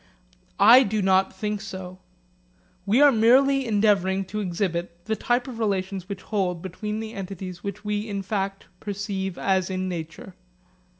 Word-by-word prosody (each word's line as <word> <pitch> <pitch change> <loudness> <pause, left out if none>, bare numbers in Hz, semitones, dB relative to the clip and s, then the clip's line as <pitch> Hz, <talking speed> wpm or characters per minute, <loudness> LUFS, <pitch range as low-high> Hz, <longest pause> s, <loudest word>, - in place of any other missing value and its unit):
I 230 +6 +9
do 215 -3 0
not 190 -1 +3
think 210 +1 -3
so. 185 -3 -8 0.9
We 225 +7 +4
are 290 -1 +8
merely 260 +3 +4
endeavouring 200 -3 +2
to 215 - -1
exhibit 175 -2 -3
the 220 - -1
type 245 +4 0
of 240 -3 -7
relations 190 -3 -2
which 195 -2 -6
hold 180 -5 -2
between 210 +4 -4
the 220 0 -7
entities 185 -2 -7
which 205 +1 -6
we 210 +1 -2
in 200 -1 -3
fact 195 0 -3
perceive 195 -2 -4
as 190 -2 +1
in 185 0 -2
nature. 170 +1 -6
195 Hz, 155 wpm, -25 LUFS, 185-215 Hz, 0.9 s, I